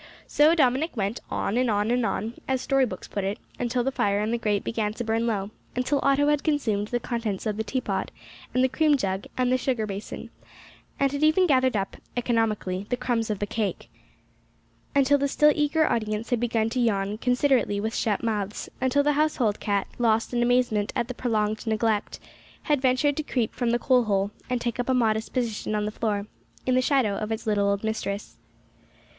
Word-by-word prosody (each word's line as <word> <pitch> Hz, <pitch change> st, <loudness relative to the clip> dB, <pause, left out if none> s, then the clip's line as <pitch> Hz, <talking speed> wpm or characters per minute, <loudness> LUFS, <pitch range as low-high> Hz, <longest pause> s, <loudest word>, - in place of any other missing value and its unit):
So 305 Hz, +3 st, +4 dB
Dominick 270 Hz, 0 st, +2 dB
went, 200 Hz, +3 st, -1 dB
"on 210 Hz, -, -1 dB
and 250 Hz, -1 st, +2 dB
on 210 Hz, +1 st, +1 dB
and 245 Hz, 0 st, +2 dB
on," 220 Hz, +3 st, -2 dB
as 265 Hz, -1 st, +1 dB
story 270 Hz, 0 st, +2 dB
books 185 Hz, -4 st, -7 dB
put 200 Hz, -, -3 dB
it, 200 Hz, +2 st, -2 dB, 0.2 s
until 245 Hz, 0 st, 0 dB
the 270 Hz, -, 0 dB
fire 200 Hz, -5 st, +1 dB
in 215 Hz, +2 st, -1 dB
the 235 Hz, -, 0 dB
grate 205 Hz, -3 st, 0 dB
began 215 Hz, -2 st, -1 dB
to 240 Hz, -, -3 dB
burn 225 Hz, +1 st, 0 dB
low; 205 Hz, -2 st, -1 dB, 0.2 s
until 250 Hz, +3 st, +1 dB
Otto 275 Hz, +1 st, +3 dB
had 295 Hz, -1 st, +1 dB
consumed 225 Hz, -10 st, 0 dB
the 240 Hz, +2 st, -1 dB
contents 230 Hz, -5 st, -3 dB
of 215 Hz, -2 st, -1 dB
the 220 Hz, -, -2 dB
teapot, 255 Hz, +4 st, -2 dB, 0.4 s
and 255 Hz, -, +2 dB
the -, -, +5 dB
cream 300 Hz, +2 st, +3 dB
jug, 190 Hz, -5 st, -2 dB
and 250 Hz, -1 st, +2 dB
the 255 Hz, -, +3 dB
sugar 245 Hz, -4 st, 0 dB
basin, 200 Hz, 0 st, -7 dB, 0.7 s
and 275 Hz, -1 st, +2 dB
had 285 Hz, 0 st, -3 dB
even 315 Hz, +4 st, +5 dB
gathered 260 Hz, -7 st, +3 dB
up, 195 Hz, -1 st, -3 dB, 0.2 s
economically, 215 Hz, -5 st, 0 dB
the 245 Hz, -, 0 dB
crumbs 240 Hz, -3 st, -1 dB
of 210 Hz, -, -1 dB
the 205 Hz, -, -2 dB
cake; 215 Hz, -1 st, -3 dB, 1.0 s
until 280 Hz, +1 st, +4 dB
the 280 Hz, -, +1 dB
still 300 Hz, +2 st, +4 dB
eager 300 Hz, +2 st, +2 dB
audience 215 Hz, +1 st, -2 dB
had 245 Hz, -, +2 dB
begun 230 Hz, -2 st, +1 dB
to 255 Hz, -, -1 dB
yawn 210 Hz, -3 st, 0 dB
considerately 250 Hz, -4 st, +2 dB
with 220 Hz, +2 st, -2 dB
shut 210 Hz, -1 st, 0 dB
mouths; 210 Hz, -3 st, -2 dB
until 260 Hz, +2 st, +3 dB
the 295 Hz, +1 st, +3 dB
household 285 Hz, -8 st, +1 dB
cat, 200 Hz, -2 st, 0 dB
lost 230 Hz, 0 st, +2 dB
in 240 Hz, -, +1 dB
amazement 240 Hz, -4 st, +2 dB
at 240 Hz, +1 st, -2 dB
prolonged 215 Hz, -2 st, -1 dB
neglect, 220 Hz, -1 st, 0 dB, 0.4 s
had 295 Hz, -4 st, +1 dB
ventured 270 Hz, +2 st, +2 dB
to 310 Hz, -, -1 dB
creep 245 Hz, -6 st, -1 dB
from 245 Hz, -2 st, -1 dB
the 240 Hz, -, +3 dB
coal 250 Hz, -1 st, +3 dB
hole, 200 Hz, -1 st, +1 dB, 0.2 s
and 250 Hz, -1 st, -1 dB
take 235 Hz, +1 st, -3 dB
up 245 Hz, -, -1 dB
a 260 Hz, -, +3 dB
modest 220 Hz, -2 st, +1 dB
position 225 Hz, -4 st, -2 dB
on 210 Hz, 0 st, 0 dB
the 210 Hz, -, -2 dB
floor, 210 Hz, -2 st, -2 dB, 0.4 s
in 255 Hz, -, +2 dB
the 255 Hz, -, +4 dB
shadow 250 Hz, -7 st, +2 dB
of 215 Hz, +1 st, -4 dB
its 225 Hz, +1 st, -3 dB
little 205 Hz, -2 st, +2 dB
old 200 Hz, +1 st, -1 dB
mistress. 215 Hz, -2 st, -3 dB
235 Hz, 205 wpm, -26 LUFS, 210-255 Hz, 1.0 s, the